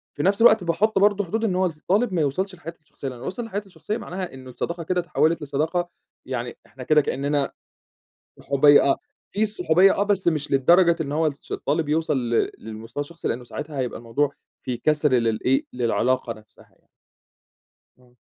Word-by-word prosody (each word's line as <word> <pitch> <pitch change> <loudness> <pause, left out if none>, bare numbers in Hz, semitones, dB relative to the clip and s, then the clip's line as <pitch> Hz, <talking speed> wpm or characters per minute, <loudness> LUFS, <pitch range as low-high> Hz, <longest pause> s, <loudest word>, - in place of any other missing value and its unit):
في 145 - -2
نفس 200 +3 +2
الوقت 220 -4 +6
باحط 195 +6 +1
برضه 205 0 +3
حدود 220 +6 -2
إن 190 -5 +1
هو 185 +1 +2
الطالب 190 +7 0
ما 170 - +1
يوصلش 185 +7 -1
لحياتي 170 -1 -10
الشخصية، 145 -2 -9
لإنه 125 -2 -7
لو - - -6
وصل 230 +6 -4
لحياتي 205 -2 -4
الشخصية 185 +4 -5
معناها 185 - -6
إنه 130 -1 -11
الصداقة 170 +7 -4
كده 180 +2 0
اتحوِّلت 170 -1 +1
لصداقة 160 +5 -1 0.4
يعني 125 -2 -4
إحنا 130 - -11
كده 150 +3 +4
كإننا 140 0 -1 0.9
صحوبية 145 +1 +5
آه، 140 - +3 0.4
في 210 - -1
الصحوبية 190 -3 +4
آه - - 0
بس 200 -3 +1
مش 150 -3 -1
للدرجة 170 +6 +5
إن 145 -3 -2
هو 160 +2 +1
الش 140 -2 -5
الطالب 150 +2 -1
يوصَل 155 -1 +1
ل 115 - +2
للمستوى 110 +4 -7
الشخصي، 165 +4 -5
لإنه 125 +1 -3
ساعتها 145 +4 -7
هيبقى 125 -2 -2
الموضوع 135 +5 -1 0.3
في 125 -2 -3
كَسْر 150 +3 +1
للإيه 120 +2 +2
للعلاقة 125 0 0
نفسها 110 -1 -18
يعني. - - -34 1.1
آه. 125 -1 -24
155 Hz, 180 wpm, -23 LUFS, 130-185 Hz, 1.1 s, الوقت